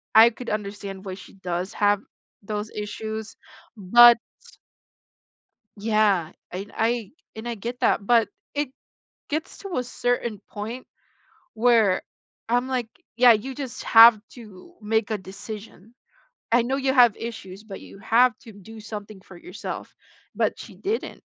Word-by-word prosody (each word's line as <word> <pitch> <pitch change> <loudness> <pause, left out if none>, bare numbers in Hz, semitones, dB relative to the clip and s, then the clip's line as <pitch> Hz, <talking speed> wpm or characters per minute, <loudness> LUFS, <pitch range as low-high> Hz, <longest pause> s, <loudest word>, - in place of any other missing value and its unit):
I 225 +1 +9
could 245 +2 -8
understand 200 -2 -5
why 190 - -5
she - - -14
does 180 0 -4
have 205 -1 +2 0.4
those 210 +1 -4
issues, 215 +1 -6 0.4
but 235 +5 +8 1.6
Yeah, 205 -6 +2 0.2
and 195 +3 -6
I 225 -2 0 0.2
and 220 +2 -7
I 235 - -3
get 240 +4 -6
that, 200 - +2
but 230 0 +4 0.2
it 290 -2 -1 0.6
gets 310 +2 -4
to 390 -4 -5
a 250 - 0
certain 245 -3 -2
point 225 +5 -6 0.7
where 225 -5 +3 0.4
I'm 245 +2 +1
like, 255 -3 -2 0.3
"Yeah, 240 0 +7
you 250 +5 -3
just 265 -3 -6
have 225 -1 +8
to 225 - -14
make 220 0 0
a 215 - -1
decision. 200 +2 -10 0.6
I 240 +1 +5
know 250 +3 -1
you 270 -1 0
have 245 -5 +6
issues, 210 -4 -8
but 200 -3 -9
you - - -13
have 235 +2 +3
to 225 - -13
do 220 +2 -12
something 210 -2 -8
for 185 -1 -14
yourself," - - -8 0.4
but - - 0
she - - -10
didn't 425 +4 -4
220 Hz, 145 wpm, -24 LUFS, 200-240 Hz, 1.6 s, I